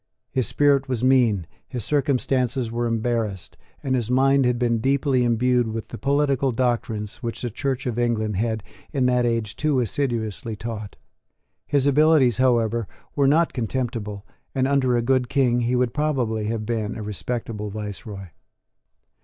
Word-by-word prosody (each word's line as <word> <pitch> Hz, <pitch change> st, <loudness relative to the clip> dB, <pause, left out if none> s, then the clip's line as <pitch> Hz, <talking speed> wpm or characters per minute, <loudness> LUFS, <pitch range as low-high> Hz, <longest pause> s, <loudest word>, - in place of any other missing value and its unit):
His 130 Hz, -5 st, 0 dB
spirit 140 Hz, -2 st, +2 dB
was 125 Hz, -2 st, -1 dB
mean; 120 Hz, -8 st, +3 dB, 0.2 s
his 120 Hz, -5 st, -5 dB
circumstances 130 Hz, -3 st, 0 dB
were 120 Hz, +1 st, -1 dB
embarrassed; 115 Hz, -4 st, -2 dB, 0.3 s
and 130 Hz, -, 0 dB
his 120 Hz, -3 st, 0 dB
mind 135 Hz, +1 st, +4 dB
had 125 Hz, -1 st, +1 dB
been 120 Hz, -1 st, +1 dB
deeply 135 Hz, +1 st, +2 dB
imbued 120 Hz, +1 st, +2 dB
with 110 Hz, 0 st, -5 dB
the -, -, -7 dB
political 140 Hz, -1 st, +1 dB
doctrines 115 Hz, -4 st, -1 dB
which 120 Hz, -1 st, -5 dB
the 120 Hz, -, -2 dB
Church 130 Hz, +3 st, -2 dB
of 120 Hz, -2 st, -2 dB
England 110 Hz, -3 st, 0 dB
had 110 Hz, 0 st, -1 dB, 0.3 s
in 135 Hz, -3 st, +1 dB
that 125 Hz, -1 st, +3 dB
age 115 Hz, -3 st, -1 dB
too 150 Hz, -3 st, +1 dB
assiduously 115 Hz, -3 st, -2 dB
taught. 105 Hz, -1 st, -6 dB, 0.7 s
His 140 Hz, -2 st, +2 dB
abilities, 145 Hz, -4 st, +4 dB
however, 115 Hz, -4 st, +2 dB, 0.3 s
were 140 Hz, -2 st, +3 dB
not 160 Hz, +4 st, +3 dB
contemptible; 115 Hz, -4 st, -3 dB, 0.3 s
and, 130 Hz, 0 st, +2 dB
under 130 Hz, -3 st, +2 dB
a 120 Hz, -, 0 dB
good 130 Hz, 0 st, +1 dB
King, 125 Hz, -3 st, +2 dB
he 120 Hz, +1 st, +1 dB
would 125 Hz, -1 st, +1 dB
probably 130 Hz, -8 st, 0 dB
have 110 Hz, 0 st, -2 dB
been 110 Hz, -2 st, -2 dB
a 110 Hz, -, -5 dB
respectable 105 Hz, +2 st, -4 dB
viceroy. 105 Hz, -2 st, -7 dB
120 Hz, 155 wpm, -23 LUFS, 110-130 Hz, 0.7 s, mind